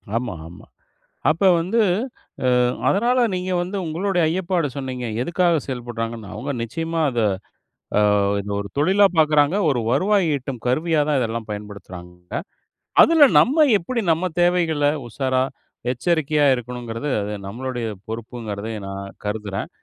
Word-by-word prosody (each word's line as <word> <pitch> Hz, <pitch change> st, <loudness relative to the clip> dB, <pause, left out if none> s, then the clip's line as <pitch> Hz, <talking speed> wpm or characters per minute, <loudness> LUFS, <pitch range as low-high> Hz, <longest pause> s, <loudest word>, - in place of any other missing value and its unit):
ஆமா, 120 Hz, -4 st, -1 dB
ஆமா. 85 Hz, -, -13 dB, 0.6 s
அப்ப 165 Hz, +6 st, 0 dB, 0.2 s
வந்து, 195 Hz, +8 st, 0 dB, 0.7 s
அ -, -, +3 dB, 0.4 s
அதனால 240 Hz, +5 st, +2 dB
நீங்க 185 Hz, 0 st, -2 dB
வந்து 185 Hz, +3 st, -4 dB
உங்களுடைய 175 Hz, +3 st, 0 dB
ஐயப்பாடு 175 Hz, -2 st, 0 dB
சொன்னீங்க, 130 Hz, -3 st, -4 dB, 0.2 s
எதுக்காக 170 Hz, +3 st, +2 dB
செயல்படுறாங்கன்னு. 115 Hz, -4 st, -5 dB
அவங்க 140 Hz, +3 st, -4 dB
நிச்சயமா 165 Hz, +6 st, -3 dB
அத 120 Hz, -2 st, -1 dB, 0.8 s
அ -, -, +4 dB, 0.4 s
இது 100 Hz, +1 st, -7 dB
ஒரு 100 Hz, -, -6 dB
தொழிலா 195 Hz, +7 st, +5 dB
பார்க்கறாங்க. 150 Hz, +2 st, +4 dB
ஒரு 125 Hz, -3 st, +1 dB
வருவாய் 195 Hz, +3 st, +2 dB
ஈட்டும் 130 Hz, -3 st, -5 dB
கருவியா 155 Hz, +5 st, +1 dB
தான் 145 Hz, -3 st, +2 dB
இதெல்லாம் 115 Hz, -1 st, -3 dB
பயன்படுத்துறாங்க. 90 Hz, -4 st, -9 dB, 0.7 s
அதுல 320 Hz, -3 st, +7 dB, 0.2 s
நம்ம 305 Hz, +5 st, +4 dB
எப்டி 230 Hz, +6 st, -3 dB
நம்ம 165 Hz, +3 st, -1 dB, 0.2 s
தேவைகள 170 Hz, -4 st, +2 dB, 0.2 s
உஷாரா, 130 Hz, +1 st, 0 dB, 0.5 s
எச்சரிக்கையா 150 Hz, +2 st, +1 dB
இருக்கணுங்கிறது 120 Hz, +1 st, -5 dB
அது 105 Hz, +1 st, -4 dB
நம்மளுடைய 120 Hz, +2 st, -4 dB, 0.2 s
பொறுப்புங்கிறத 110 Hz, -2 st, -5 dB, 0.2 s
நான் 100 Hz, 0 st, -6 dB, 0.2 s
கருதுறேன். 105 Hz, -2 st, -3 dB
135 Hz, 125 wpm, -22 LUFS, 115-175 Hz, 0.8 s, அதுல